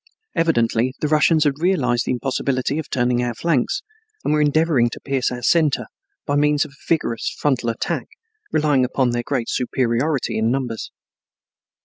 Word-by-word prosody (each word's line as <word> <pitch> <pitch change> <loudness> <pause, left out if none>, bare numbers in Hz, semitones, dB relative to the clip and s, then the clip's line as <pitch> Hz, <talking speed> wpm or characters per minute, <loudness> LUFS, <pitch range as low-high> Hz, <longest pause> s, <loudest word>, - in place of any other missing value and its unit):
Evidently 130 -5 +1
the 150 - 0
Russians 155 +1 +4
had 145 -1 0
realized 150 -9 +1
the - - +1
impossibility 130 +2 -1
of 160 - -6
turning 120 -1 +1
our 120 -1 -2
flanks 170 - 0 0.4
and - - +1
were 150 - +3
endeavoring 150 -4 +3
to - - -8
pierce 135 -2 -1
our 125 0 -6
center 155 -5 +2 0.4
by 145 - 0
means 150 +1 +3
of 150 - -12
a 140 - -22
vigorous 150 -8 0
frontal 130 -5 +1
attack, 115 - -2 0.4
relying 150 -4 +2
upon 125 0 +1
their 120 0 -1
great 120 -1 -2
superiority 125 +2 0
in 110 +1 +2
numbers. 125 -3 -2
135 Hz, 160 wpm, -21 LUFS, 120-150 Hz, 0.4 s, Russians